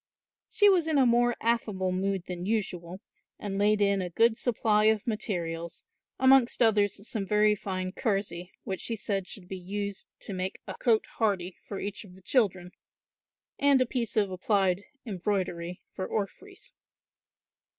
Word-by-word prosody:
She 410 - +4
was 360 -5 +4
in 315 -2 +2
a 265 - +5
more 240 0 +3
affable 215 -5 0
mood 190 0 -1
than 180 -1 -5
usual 185 -4 -2 0.4
and 200 -1 -4
laid 210 +1 +3
in 200 -1 +3
a 180 - -3
good 225 +6 +3
supply 215 -3 +2
of 220 -1 +3
materials, 170 -6 -3 0.3
amongst 265 -2 +5
others 205 -2 +2
some 215 - -2
very 210 +1 +4
fine 185 -2 -3
kersey, 190 -5 -2
which 190 -1 -4
she 230 - -2
said 195 -3 -2
should 180 0 -7
be 190 0 -6
used 200 +2 -5
to 200 - -5
make 185 +1 -3
a - - -5
cote 225 -3 +2
hardie 190 -5 0
for 200 - -5
each 205 +2 -5
of 185 -3 -14
the 190 - -16
children, 185 -8 +1 0.9
and 280 -1 +5
a 255 - +3
piece 235 -2 -2
of 200 -3 +2
applied 190 0 +1 0.2
embroidery 180 -4 -2
for 185 - -4
orphreys. 375 - -5
200 Hz, 160 wpm, -28 LUFS, 185-225 Hz, 0.9 s, a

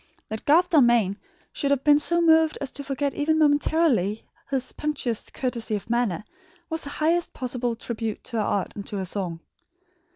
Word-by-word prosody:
That 220 0 -6
Garth 340 +5 +4
Dalmain 235 - +4 0.4
should 280 - -1
have 280 -1 +1
been 295 0 +6
so 340 +3 +2
moved 320 -1 +4
as 280 -2 -3
to 285 - -7
forget 280 +1 -2
even 315 +2 +1
momentarily 290 - +2 0.2
his 265 -2 -2
punctilious 275 -7 -2
courtesy 235 -4 -2
of 210 +2 -6
manner, 235 -7 0 0.5
was 320 -1 -2
the - - -5
highest 330 +4 0
possible 245 -2 -2
tribute 225 -2 -4
to 235 - -4
her 215 - +1
art 200 -2 -1
and 205 - -5
to 205 - -4
her 190 - -2
song. 175 -3 -3
260 Hz, 175 wpm, -25 LUFS, 220-300 Hz, 0.5 s, been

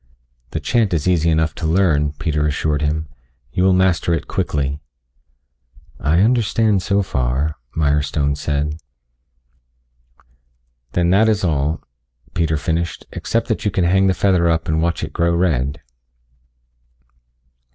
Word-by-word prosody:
"The - - -3
chant 110 -7 +1
is 80 +1 -1
easy 85 -3 +2
enough 80 -1 +1
to 80 - -3
learn," 80 -4 +2
Peter 75 0 -1
assured 75 0 -1
him. 75 +1 -1 0.5
"You 90 - +1
will 95 - +5
master 90 -2 +2
it - - -5
quickly." 70 0 -2 1.2
"I 80 +5 +2
understand 110 -3 +2
so 100 +2 +1
far," 65 +1 -1 0.2
Mirestone 75 -1 +1
said. 75 +1 -2 2.2
"Then 85 0 +2
that 110 +4 +4
is 105 -2 +1
all," 75 -2 0 0.5
Peter 80 -2 0
finished, 85 +3 -2
"except - - -2
that - - -1
you 105 - +1
can 95 -2 0
hang 95 +3 +3
the 95 - +2
feather 90 -4 +2
up 80 0 0
and 80 0 +1
watch 85 -1 -1
it 75 -1 -5
grow 85 0 +1
red." 75 -4 0
80 Hz, 135 wpm, -19 LUFS, 75-90 Hz, 2.2 s, will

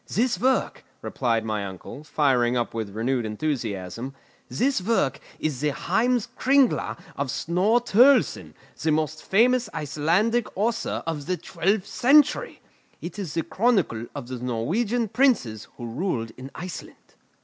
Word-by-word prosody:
"This 245 +3 0
work," 260 +1 +1 0.2
replied 115 -3 0
my 105 -2 -2
uncle, 95 +9 -8
firing 125 -6 +2
up 120 - -2
with 110 -3 -3
renewed 120 +2 0
enthusiasm, 115 0 -3 0.3
"this 250 - +1
work 185 -9 +1 0.2
is 145 -4 -3
the 150 - +2
Heims 240 - +1
Kringla 270 -1 +3 0.2
of 140 -1 -2
Snorre 190 - +1
Turlleson, 250 +6 +4 0.3
the 160 - +1
most 155 0 -1
famous 245 +5 +3
Icelandic 165 - +1
author 225 +3 -1
of 160 -3 -4
the 185 0 0
twelfth 195 +4 -1
century! 285 +6 +3 0.4
It 180 +4 -7
is 175 -7 -5
the 165 - 0
chronicle 185 - +1
of 120 - -6
the 130 -1 -6
Norwegian 195 - -1
princes 200 - +1
who 120 - -6
ruled 115 - -2
in 130 +1 -10
Iceland." 180 -1 -7
160 Hz, 140 wpm, -25 LUFS, -, 0.4 s, Turlleson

